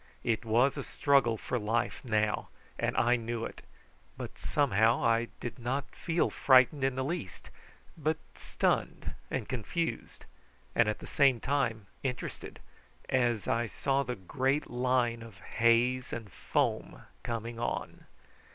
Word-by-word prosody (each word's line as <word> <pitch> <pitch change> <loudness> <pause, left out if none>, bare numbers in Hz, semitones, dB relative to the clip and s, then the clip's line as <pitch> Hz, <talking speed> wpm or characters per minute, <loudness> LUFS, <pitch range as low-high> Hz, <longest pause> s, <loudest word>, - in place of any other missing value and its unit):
It 115 -2 0
was 120 +5 +3
a - - -3
struggle 135 -6 +3
for 125 - -2
life 115 +3 -1
now, 110 -3 0 0.3
and - - 0
I 120 +1 +4
knew 115 0 -3
it; - - -8 0.6
but - - -6
somehow 115 -5 +2
I 115 0 +3
did 120 +2 -6
not 130 +4 -3
feel 170 0 0
frightened 130 +2 +5
in 135 -1 +1
the 130 - -1
least, 150 - -5 0.4
but 155 0 0 0.2
stunned - - -1 0.2
and - - -2
confused, 160 - -3 0.5
and 120 -3 +4
at 105 - -1
the - - -10
same 135 -4 +3
time 120 -6 0 0.2
interested, 125 -2 -5 0.5
as 120 -5 +1
I 115 0 +1
saw 135 +4 0
the 125 -2 -3
great 130 +9 -1
line 125 -1 +1
of 115 -4 -11
haze 115 +4 +2
and 110 -4 -6
foam - - -1 0.2
coming 115 0 -4
on. 120 - -3
120 Hz, 140 wpm, -31 LUFS, 115-135 Hz, 0.6 s, frightened